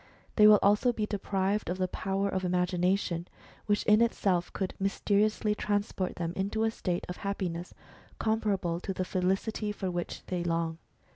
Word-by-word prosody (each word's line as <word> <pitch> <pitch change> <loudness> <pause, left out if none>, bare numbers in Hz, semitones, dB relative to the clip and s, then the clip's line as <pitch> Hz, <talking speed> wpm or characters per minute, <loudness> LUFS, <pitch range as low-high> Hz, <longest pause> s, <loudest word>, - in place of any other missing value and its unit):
They 210 -1 +7
will 210 0 +9
also 210 +5 +4
be 220 -3 -2
deprived 200 -1 -1
of 180 - -1
the 185 -1 0
power 195 +2 -1
of 190 -1 -2
imagination, 180 0 0 0.4
which 205 0 +2
in 215 +1 +5
itself 190 -6 +1
could 190 -2 -3
mysteriously 210 +2 +1
transport 205 -3 -1
them 170 0 -3
into 200 +3 -1
a 225 - +2
state 180 -5 -2
of 180 - -6
happiness 180 -4 -4 0.4
comparable 200 -6 0
to 190 +1 -4
the 185 - -1
felicity 195 +4 -1
for 195 -3 -3
which 175 -1 -4
they 180 -2 -2
long. 165 -1 -1
195 Hz, 160 wpm, -30 LUFS, 180-210 Hz, 0.4 s, will